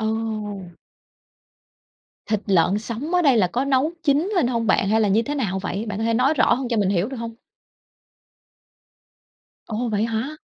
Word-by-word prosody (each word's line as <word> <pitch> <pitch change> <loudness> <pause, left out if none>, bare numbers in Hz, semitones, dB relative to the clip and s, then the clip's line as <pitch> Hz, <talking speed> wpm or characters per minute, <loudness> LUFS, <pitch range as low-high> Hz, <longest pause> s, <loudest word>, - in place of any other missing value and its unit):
Ồ! 215 -5 -4 1.5
Thịt 215 -2 0
lợn 190 +1 +3
sống 240 +10 -5
ở 355 - +4
đây 275 -5 +4
là 195 -5 +4
có 245 +9 -1
nấu 275 +4 +1
chín 310 +6 +1
lên 340 - +3
hông 230 -2 -1
bạn? 195 - +2
Hay 220 +1 +3
là 210 - +2
như 215 +4 +3
thế 290 +5 -4
nào 195 -9 -1
vậy? 200 +2 -3
Bạn 205 -1 -4
có 225 - -1
thể 230 - +1
nói 260 +6 +3
rõ 255 - +4
hơn 255 0 -4
cho 235 - -1
mình 200 -3 +2
hiểu 195 +3 0
được 265 - -6
hông? 230 0 -6 2.3
Ồ, 235 +2 -2
vậy 210 0 0
hả? 230 +7 -3
225 Hz, 190 wpm, -22 LUFS, 205-260 Hz, 2.3 s, ở